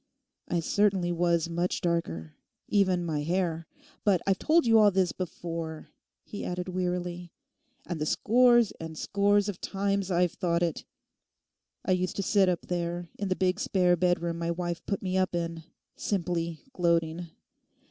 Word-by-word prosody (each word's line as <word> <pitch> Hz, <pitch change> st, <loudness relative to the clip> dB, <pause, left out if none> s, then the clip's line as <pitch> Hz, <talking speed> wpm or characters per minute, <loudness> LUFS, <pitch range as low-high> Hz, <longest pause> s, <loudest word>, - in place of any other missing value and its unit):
I 175 Hz, -, 0 dB
certainly 190 Hz, -1 st, +2 dB
was 170 Hz, -1 st, +1 dB
much 170 Hz, +2 st, -1 dB
darker, 85 Hz, -, -2 dB, 0.3 s
even 185 Hz, -4 st, +2 dB
my 155 Hz, -3 st, -1 dB
hair. 165 Hz, 0 st, -1 dB, 0.4 s
But 195 Hz, -4 st, +3 dB
I've 195 Hz, -1 st, +1 dB
told 325 Hz, +2 st, +3 dB
you 225 Hz, -1 st, +6 dB
all 210 Hz, -1 st, +7 dB
this 190 Hz, -2 st, +1 dB
before,' 165 Hz, -3 st, -5 dB, 0.3 s
he 205 Hz, -, -7 dB
added 180 Hz, +1 st, -3 dB
wearily, 180 Hz, -1 st, -3 dB, 0.5 s
'and 175 Hz, -3 st, -4 dB
the 150 Hz, -, 0 dB
scores 240 Hz, +2 st, +4 dB
and 160 Hz, -1 st, -7 dB
scores 205 Hz, +2 st, +2 dB
of 200 Hz, -4 st, -5 dB
times 200 Hz, -1 st, -1 dB
I've 180 Hz, -1 st, +2 dB
thought 170 Hz, -2 st, 0 dB
it. 165 Hz, -3 st, -2 dB, 1.0 s
I -, -, 0 dB
used 185 Hz, 0 st, 0 dB
to 200 Hz, -, -1 dB
sit 195 Hz, -1 st, +3 dB
up 175 Hz, -2 st, 0 dB
there 175 Hz, -1 st, -3 dB
in 200 Hz, -, -1 dB
the 185 Hz, -, 0 dB
big 185 Hz, +1 st, +1 dB
spare 180 Hz, -2 st, +3 dB
bedroom 170 Hz, -1 st, 0 dB
my 170 Hz, 0 st, -2 dB
wife 175 Hz, 0 st, -3 dB
put 200 Hz, -1 st, -2 dB
me 185 Hz, 0 st, 0 dB
up 185 Hz, -1 st, 0 dB
in, 165 Hz, -1 st, -3 dB, 0.3 s
simply 170 Hz, -4 st, -2 dB
gloating. 170 Hz, -1 st, +1 dB
180 Hz, 155 wpm, -28 LUFS, 170-190 Hz, 1.0 s, all